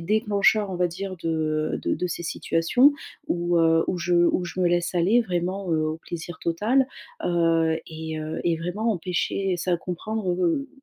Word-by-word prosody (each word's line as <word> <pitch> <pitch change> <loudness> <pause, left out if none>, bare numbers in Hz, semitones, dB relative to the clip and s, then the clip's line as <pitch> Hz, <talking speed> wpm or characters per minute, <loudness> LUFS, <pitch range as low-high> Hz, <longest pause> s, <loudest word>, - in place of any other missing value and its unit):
déclencheurs 210 +1 +2
on 185 - -3
va 180 0 +2
dire 185 +2 -5
de 155 -2 -1
de - - 0
de 180 +3 -1
ces 170 0 -4
situations 175 - +3 0.3
où, 175 - +1
heu, 165 0 +4
où 180 - -1
je 175 +1 0
où 175 +1 +3
je 180 +1 -5
me 180 - +4
laisse 175 +1 0
aller 190 +8 +4
vraiment, 185 -1 -2
heu, 155 -1 +1
au 155 +1 -2
plaisir 170 0 -7
total. 215 +11 +1 0.4
Heu, 165 -2 +2
et, 160 -1 -5
heu 155 +1 -4
et 170 -1 +2
vraiment 205 +7 -1
empêcher 180 +1 -1
c'est 180 +2 -1
à - - +3
comprendre, 185 +4 -3
heu, 180 - 0
175 Hz, 185 wpm, -25 LUFS, 165-195 Hz, 0.4 s, heu